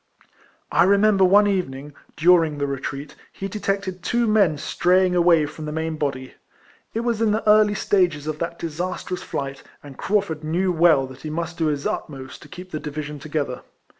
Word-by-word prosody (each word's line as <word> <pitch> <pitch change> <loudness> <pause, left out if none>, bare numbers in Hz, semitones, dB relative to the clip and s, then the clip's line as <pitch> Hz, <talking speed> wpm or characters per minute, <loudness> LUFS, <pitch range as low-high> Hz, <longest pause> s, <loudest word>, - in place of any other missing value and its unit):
I 170 - +4
remember 200 0 +4
one 200 +3 +6
evening, 150 -8 -2 0.2
during 165 -2 +4
the 145 - -1
retreat, 140 +1 -5 0.2
he 195 - -5
detected 195 -2 -3
two 240 +6 +1
men 205 -8 +3
straying 180 +4 +2
away 170 -3 +4
from 155 +1 -8
the 150 - -4
main 160 +1 -2
body: 135 -4 -3 0.6
it 225 - 0
was 235 -2 -1
in 225 - +3
the 215 +1 -1
early 210 0 +5
stage 185 -4 +2
of 155 0 -4
that 170 0 -3
disastrous 180 +2 -4
flight, 135 -1 -5 0.2
and 140 -2 -12
Craufurd 195 -7 -1
knew 175 +4 0
well 160 -5 +4
that 130 0 -12
he 155 - -6
must 170 +2 -4
do 160 - +2
his 145 -2 -2
utmost 130 -3 -5
to - - -13
keep 180 +4 -11
the 155 - -3
division 150 0 -6
together. 145 -3 -3
165 Hz, 180 wpm, -22 LUFS, 150-190 Hz, 0.6 s, one